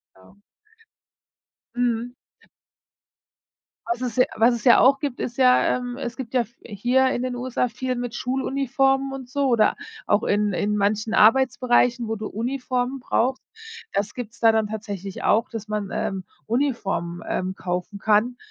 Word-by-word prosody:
Genau. 95 Hz, -, -21 dB, 1.3 s
Mhm. 245 Hz, 0 st, -1 dB, 1.7 s
Was 235 Hz, +1 st, -2 dB
es 245 Hz, -3 st, -3 dB
ja 255 Hz, -, +5 dB
was 235 Hz, +2 st, +5 dB
es 235 Hz, -, -5 dB
ja 245 Hz, -, +7 dB
auch 275 Hz, +1 st, +5 dB
gibt, 280 Hz, -5 st, -4 dB
ist 240 Hz, 0 st, -4 dB
ja, 255 Hz, -1 st, +4 dB
ähm 245 Hz, 0 st, -6 dB
es 245 Hz, -3 st, -5 dB
gibt 260 Hz, -2 st, -7 dB
ja 250 Hz, -, +3 dB
f 235 Hz, +1 st, -9 dB
hier 245 Hz, +5 st, +1 dB
in 245 Hz, -, -2 dB
den 255 Hz, -1 st, -3 dB
USA 250 Hz, 0 st, -1 dB
viel 255 Hz, +3 st, -3 dB
mit 245 Hz, -1 st, -4 dB
Schuluniformen 270 Hz, +1 st, 0 dB
und 265 Hz, -2 st, -7 dB
so 280 Hz, 0 st, 0 dB
oder 230 Hz, -4 st, +3 dB, 0.3 s
auch 205 Hz, -, +2 dB
in 205 Hz, -1 st, +1 dB
in 210 Hz, +3 st, 0 dB
manchen 215 Hz, +2 st, 0 dB
Arbeitsbereichen, 245 Hz, 0 st, +3 dB
wo 225 Hz, -, -2 dB
du 215 Hz, 0 st, -5 dB
Uniformen 250 Hz, +2 st, -2 dB
brauchst. 255 Hz, +1 st, 0 dB, 0.5 s
Das 200 Hz, +1 st, -2 dB
gibt 235 Hz, -3 st, -7 dB
es -, -, -20 dB
da 225 Hz, -1 st, +6 dB
dann 220 Hz, -1 st, +1 dB
tatsächlich 200 Hz, -3 st, -6 dB
auch, 230 Hz, +4 st, +2 dB
dass 220 Hz, -2 st, -7 dB
man, 210 Hz, -2 st, -3 dB
ähm, 190 Hz, -1 st, -2 dB, 0.2 s
Uniformen, 200 Hz, -9 st, -1 dB
ähm, 185 Hz, +1 st, -2 dB
kaufen 180 Hz, +3 st, -4 dB
kann, 220 Hz, +3 st, +2 dB
240 Hz, 160 wpm, -23 LUFS, 210-255 Hz, 1.7 s, ja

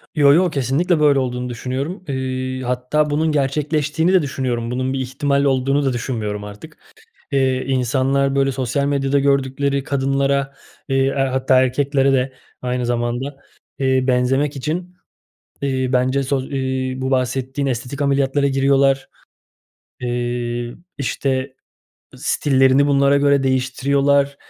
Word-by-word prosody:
Yo, 145 Hz, -2 st, +6 dB
yo, 180 Hz, +2 st, +4 dB
kesinlikle, 150 Hz, +5 st, 0 dB
böyle, 145 Hz, -2 st, +4 dB
olduğunu 125 Hz, -1 st, -3 dB
düşünüyorum. 130 Hz, +9 st, -4 dB
Eee, 130 Hz, -1 st, -3 dB
hatta 125 Hz, +5 st, 0 dB
bunun 155 Hz, +2 st, +1 dB
gerçekleştiğini 150 Hz, +4 st, 0 dB
de 185 Hz, -, +5 dB
düşünüyorum. 125 Hz, -4 st, -2 dB
Bunun 130 Hz, +1 st, -1 dB
bir 135 Hz, -, -2 dB
ihtimal 140 Hz, +2 st, 0 dB
olduğunu 135 Hz, +1 st, +1 dB
da 130 Hz, -, +1 dB
düşünmüyorum 110 Hz, -4 st, -3 dB
artık. 105 Hz, 0 st, -11 dB, 0.6 s
Eee, 130 Hz, -1 st, +1 dB
insanlar 135 Hz, +1 st, +1 dB
böyle 135 Hz, 0 st, +2 dB
sosyal 135 Hz, +2 st, -1 dB
medyada 140 Hz, 0 st, +1 dB
gördükleri 140 Hz, 0 st, 0 dB
kadınlara, 140 Hz, 0 st, 0 dB, 0.3 s
iii, 135 Hz, 0 st, +1 dB
a 135 Hz, -2 st, 0 dB
hatta 130 Hz, 0 st, +3 dB
erkeklere 135 Hz, +1 st, +1 dB
de 130 Hz, 0 st, +1 dB, 0.3 s
aynı 125 Hz, -1 st, -2 dB
zamanda, 120 Hz, +3 st, -2 dB, 0.4 s
iii, 130 Hz, -1 st, +1 dB
benzemek 135 Hz, +3 st, +1 dB
için, 175 Hz, +6 st, -4 dB, 0.7 s
iii, 130 Hz, -2 st, -1 dB
bence 130 Hz, +2 st, +2 dB
soz 135 Hz, 0 st, -2 dB
iii, 130 Hz, -1 st, -2 dB
bu 130 Hz, +1 st, -2 dB
bahsettiğin 130 Hz, +2 st, -1 dB
estetik 130 Hz, +3 st, -3 dB
ameliyatlara 140 Hz, 0 st, +1 dB
giriyorlar. 135 Hz, 0 st, +2 dB, 0.9 s
Eee, 120 Hz, -1 st, -3 dB, 0.2 s
işte, 135 Hz, -1 st, -2 dB, 0.6 s
stillerini 135 Hz, 0 st, +3 dB
bunlara 140 Hz, 0 st, +3 dB
göre 140 Hz, -1 st, +3 dB
değiştiriyorlar. 140 Hz, +2 st, +1 dB
135 Hz, 125 wpm, -20 LUFS, 130-140 Hz, 0.9 s, Yo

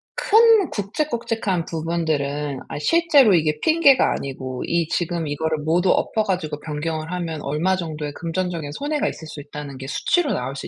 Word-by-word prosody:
큰 445 Hz, -3 st, +5 dB
굵직굵직한 220 Hz, -, -2 dB
부분들은 150 Hz, -4 st, -2 dB
아 -, -, -5 dB
실제로 295 Hz, -, +4 dB
이게 155 Hz, -2 st, +1 dB
핑계가 310 Hz, -5 st, +5 dB
아니고 130 Hz, -2 st, -5 dB
이 170 Hz, -1 st, +1 dB
지금 170 Hz, -2 st, -1 dB
이거를 155 Hz, +2 st, -1 dB
모두 175 Hz, +4 st, +2 dB
엎어 220 Hz, -, +1 dB
가지고 180 Hz, -7 st, -2 dB
변경을 155 Hz, +1 st, -4 dB
하면 170 Hz, -4 st, -4 dB
얼마 155 Hz, +7 st, +1 dB
정도의 155 Hz, -4 st, -5 dB
금전적인 170 Hz, -2 st, -3 dB
손해가 295 Hz, -, -1 dB
있을 160 Hz, -, -9 dB
수 150 Hz, -, -8 dB
있다는 145 Hz, -1 st, -8 dB
게 135 Hz, -, -7 dB
수치로 305 Hz, -, +1 dB
나올 135 Hz, -, -3 dB
수 140 Hz, -, -6 dB
165 Hz, 365 characters per minute, -22 LUFS, 150-205 Hz, -, 큰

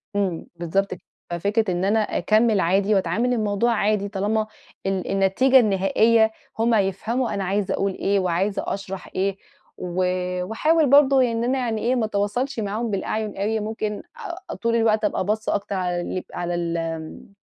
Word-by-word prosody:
إمم، 190 Hz, -5 st, -1 dB
بالضبط 180 Hz, +4 st, -1 dB
ك 180 Hz, -, -10 dB, 0.3 s
ففكرة 200 Hz, +4 st, 0 dB
إن 180 Hz, +1 st, -1 dB
أنا 215 Hz, +3 st, +3 dB
أكمّل 215 Hz, 0 st, +2 dB
عادي 195 Hz, +4 st, +2 dB
وأتعامل 200 Hz, +7 st, +1 dB
الموضوع 215 Hz, 0 st, +1 dB
عادي، 210 Hz, -1 st, +1 dB
طالما 210 Hz, +2 st, 0 dB, 0.4 s
ال 195 Hz, -1 st, -1 dB
النتيجة 195 Hz, +8 st, +4 dB
النهائية 220 Hz, +2 st, +3 dB, 0.3 s
هم 230 Hz, +1 st, +3 dB
هيفهموا 220 Hz, +5 st, 0 dB
أنا 200 Hz, -1 st, -2 dB
عايزة 195 Hz, +1 st, 0 dB
أقول 195 Hz, 0 st, 0 dB
إيه 200 Hz, +1 st, +1 dB
وعايزة 190 Hz, +3 st, 0 dB
أشرح 195 Hz, -1 st, -5 dB
إيه، 195 Hz, +1 st, 0 dB, 0.4 s
و 180 Hz, +1 st, -2 dB, 0.4 s
وأحاول 305 Hz, -, +2 dB
برضه 275 Hz, -1 st, +6 dB
يعني 230 Hz, -2 st, +1 dB
إن -, -, -1 dB
أنا 255 Hz, +3 st, +1 dB
يعني 230 Hz, -4 st, -1 dB
إيه، 245 Hz, +3 st, +1 dB
ما 235 Hz, -3 st, +1 dB
أتواصلش 220 Hz, +6 st, -1 dB
معاهم 220 Hz, +2 st, -2 dB
بالأعين 210 Hz, +2 st, -2 dB
أوي، 215 Hz, +3 st, 0 dB
ممكن 215 Hz, -1 st, -4 dB, 0.5 s
أ -, -, -3 dB
طول 230 Hz, 0 st, 0 dB
الوقت 220 Hz, -2 st, +2 dB
أبقى 205 Hz, -, 0 dB
باصّة 215 Hz, +2 st, 0 dB
أكتر 200 Hz, 0 st, -3 dB
على 180 Hz, -2 st, -1 dB
ال 185 Hz, +1 st, -4 dB
على 175 Hz, 0 st, -2 dB
ال 170 Hz, -1 st, -2 dB
آمم 165 Hz, +3 st, -6 dB
205 Hz, 170 wpm, -23 LUFS, 190-225 Hz, 0.5 s, برضه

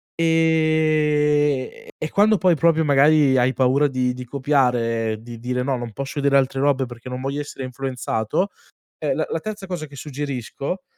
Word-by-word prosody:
Ehm, 155 Hz, -3 st, +2 dB, 0.3 s
e 155 Hz, -, -4 dB
quando 210 Hz, +1 st, +4 dB
poi 180 Hz, -3 st, +3 dB
proprio 160 Hz, 0 st, +2 dB
magari 145 Hz, -1 st, +4 dB
hai 125 Hz, +1 st, +2 dB
paura 130 Hz, +4 st, +3 dB
di 125 Hz, -2 st, -1 dB
di 125 Hz, 0 st, -7 dB
copiare, 120 Hz, -5 st, 0 dB
di 115 Hz, 0 st, -10 dB
dire: 125 Hz, +1 st, -2 dB
"No, 135 Hz, 0 st, 0 dB
non 120 Hz, -1 st, -6 dB
posso 140 Hz, +3 st, -5 dB
vedere 140 Hz, 0 st, +3 dB
altre 135 Hz, 0 st, -1 dB
robe 140 Hz, -2 st, +2 dB
perché 120 Hz, +1 st, -10 dB
non 125 Hz, 0 st, -5 dB
voglio 140 Hz, +2 st, -3 dB
essere 140 Hz, -2 st, -7 dB
influenzato", 130 Hz, -, -2 dB, 0.5 s
eh, -, -, -1 dB
la -, -, -1 dB
la -, -, -1 dB
terza 215 Hz, -2 st, -6 dB
cosa 170 Hz, -4 st, -4 dB
che 145 Hz, -, -16 dB
suggerisco, 140 Hz, +4 st, -5 dB
140 Hz, 170 wpm, -22 LUFS, 125-155 Hz, 0.5 s, quando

